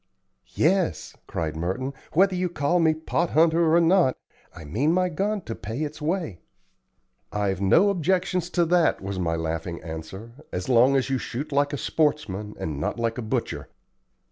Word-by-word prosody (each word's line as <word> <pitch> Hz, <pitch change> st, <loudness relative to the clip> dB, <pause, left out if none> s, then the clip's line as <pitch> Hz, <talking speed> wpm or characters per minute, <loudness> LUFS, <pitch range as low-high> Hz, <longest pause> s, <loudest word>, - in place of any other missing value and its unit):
"Yes," 180 Hz, +2 st, +1 dB
cried 80 Hz, -2 st, -3 dB
Merton, 95 Hz, -, -3 dB, 0.2 s
"whether 190 Hz, +3 st, +4 dB
you 180 Hz, 0 st, 0 dB
call 165 Hz, +2 st, +1 dB
me 160 Hz, -2 st, +3 dB
'pot 160 Hz, +2 st, -1 dB
hunter' 165 Hz, +1 st, +4 dB
or -, -, +6 dB
not, 170 Hz, -5 st, +3 dB, 0.3 s
I 80 Hz, -3 st, -11 dB
mean 130 Hz, -, +1 dB
my 180 Hz, 0 st, +2 dB
gun 200 Hz, +5 st, -1 dB
to 115 Hz, -, -6 dB
pay 115 Hz, +8 st, -5 dB
its 150 Hz, +1 st, -6 dB
way." 160 Hz, -, -2 dB, 0.9 s
"I've 100 Hz, -2 st, -1 dB
no 170 Hz, -, +5 dB
objections 180 Hz, 0 st, 0 dB
to 175 Hz, -, +4 dB
that," 170 Hz, 0 st, +3 dB
was 95 Hz, 0 st, -5 dB
my 85 Hz, -2 st, 0 dB
laughing 80 Hz, +1 st, -3 dB
answer, 80 Hz, +7 st, -8 dB, 0.2 s
"as 90 Hz, -, -4 dB
long 130 Hz, +2 st, +5 dB
as 135 Hz, 0 st, +1 dB
you 130 Hz, -, +1 dB
shoot 145 Hz, +7 st, -5 dB
like 145 Hz, 0 st, +2 dB
a 145 Hz, -, -2 dB
sportsman, 110 Hz, -11 st, -1 dB
and 75 Hz, -3 st, -4 dB
not -, -, -2 dB
like 115 Hz, +1 st, -1 dB
a -, -, -2 dB
butcher. 110 Hz, -, -3 dB
140 Hz, 170 wpm, -25 LUFS, -, 0.9 s, or